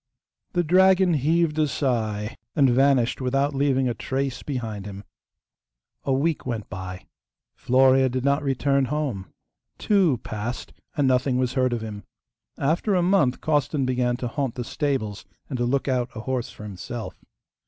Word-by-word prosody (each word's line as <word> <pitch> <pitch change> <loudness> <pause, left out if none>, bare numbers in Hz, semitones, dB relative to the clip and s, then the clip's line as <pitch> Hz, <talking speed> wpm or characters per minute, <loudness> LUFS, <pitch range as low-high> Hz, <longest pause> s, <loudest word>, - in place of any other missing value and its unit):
The 175 - +2
dragon 185 +1 +5
heaved 155 +2 +1
a 155 - +3
sigh 110 -6 -1 0.2
and 140 -3 +5
vanished 135 -1 +3
without 135 +3 +1
leaving 135 -1 +2
a 120 - 0
trace 135 +3 -3
behind 110 -7 -4
him. 100 0 -8 1.0
A 140 - 0
week 145 +4 +1
went 115 -4 -4
by. 95 0 -7 0.5
Florea 130 +1 +4
did 130 +1 -2
not 140 +1 +2
return 140 0 +1
home. 130 -10 -3 0.5
Two 190 - +3
passed; 110 +3 -5 0.2
and 145 -2 +3
nothing 130 0 +2
was 125 -1 0
heard 130 -2 +2
of 120 -2 -2
him. 105 -2 -6 0.6
After 170 +8 +1
a 180 - +2
month 175 -9 +2
Costan 145 -2 +1
began 125 -1 0
to 125 - -3
haunt 130 0 -2
the 125 - -3
stables 115 -6 -2 0.3
and 130 - -2
to 120 - +1
look 135 +3 0
out 125 -2 0
a 110 - -5
horse 125 0 -2
for - - -11
himself. 105 +4 -6
130 Hz, 160 wpm, -24 LUFS, 120-145 Hz, 1.0 s, dragon